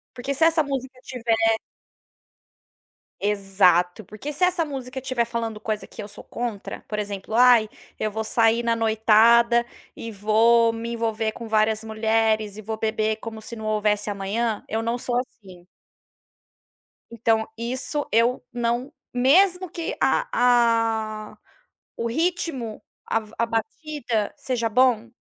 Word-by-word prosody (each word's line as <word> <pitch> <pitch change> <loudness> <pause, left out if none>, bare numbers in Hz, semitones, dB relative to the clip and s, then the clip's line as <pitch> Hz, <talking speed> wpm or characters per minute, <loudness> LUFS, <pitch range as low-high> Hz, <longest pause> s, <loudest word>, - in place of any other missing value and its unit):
Porque 260 +2 -3
se 280 +4 +3
essa 325 -1 +4
musica 265 -2 -5
tiver 235 -3 -1 1.8
Exato. 195 -2 +2
Porque 215 +10 -7
se 295 - -1
essa 360 -2 +2
música 265 -3 -6
tiver 255 -2 0
falando 230 -2 -4
coisa 215 -1 -4
que - - -9
eu - - -8
sou 205 - -12
contra, 235 -4 -5
por 210 - -3
exemplo, 205 0 -5
"Ai, 240 -2 +6 0.3
eu 215 - -1
vou 220 +1 -3
sair 225 +1 +2
na 230 -1 +1
noitada, 230 +2 +4 0.3
e 230 - -7
vou 225 +3 +3
me 230 +1 -5
envolver 225 -1 -1
com 230 +1 -9
várias 215 0 +1
mulheres, 220 -1 0
e - - -7
vou 220 +1 -5
beber 220 0 0
como 220 0 -8
se 235 - -8
não 220 -1 -7
houvesse 210 -1 0
amanhã", 205 +3 -2
eu 220 +1 -2
não 230 +1 -1
sou 245 0 -3
assim. 195 -8 -7 1.5
Então, 225 -1 +1
isso 255 +5 -3
eu 235 +3 +2
não 240 +3 -1 0.2
mesmo 360 +9 +4
que 350 +8 -4
a - - +2 1.0
a - - -19 0.6
o 235 - -2
ritmo, 310 -5 -2 0.2
a 225 - +1
v 215 0 -16
a 230 - +2
batida 235 -1 -3
seja 240 -3 -1
bom, 235 -1 +2
230 Hz, 145 wpm, -24 LUFS, 215-250 Hz, 1.8 s, Ai